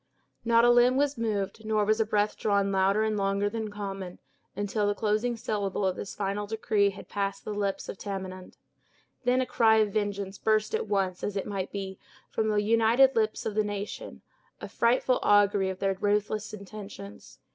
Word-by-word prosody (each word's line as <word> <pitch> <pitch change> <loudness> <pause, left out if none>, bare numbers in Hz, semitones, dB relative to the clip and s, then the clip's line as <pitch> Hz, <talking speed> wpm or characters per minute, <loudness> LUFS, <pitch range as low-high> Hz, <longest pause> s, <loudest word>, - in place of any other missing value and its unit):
Not 230 0 +4
a 240 - +6
limb 245 +2 +5
was 290 0 +1
moved, 220 -2 -2
nor 215 -1 +1
was 215 +2 +2
a 220 - +2
breath 210 0 +1
drawn 200 -2 +1
louder 195 +2 +2
and 220 -1 0
longer 200 0 0
than 220 -1 -3
common, 195 -3 -6 0.4
until 205 +1 -1
the 205 - +1
closing 220 +3 0
syllable 205 -3 -2
of 185 -1 +1
this 200 - -7
final 205 +1 -2
decree 210 -1 +1
had 200 - -10
passed 200 -1 -3
the 210 - -3
lips 200 -1 -2
of - - -7
Tamenund. 190 -2 -6 0.7
Then 250 +1 +3
a - - 0
cry 225 -3 +4
of 210 -2 +2
vengeance 200 -2 -2
burst 215 - +1
at 445 +1 -1
once, 190 -3 -1
as 205 -1 -2
it 195 - -2
might 195 -2 -4
be, 195 -1 -5 0.3
from 220 - 0
the 210 - +1
united 230 +5 +4
lips 215 -1 0
of 220 - -2
the 215 +1 +2
nation; 205 - -6 0.4
a - - -6
frightful 250 +2 +2
augury 205 -2 +4
of 190 - -4
their 195 0 0
ruthless 210 +2 -1
intentions. 200 -1 -10
205 Hz, 190 wpm, -28 LUFS, 195-220 Hz, 0.7 s, a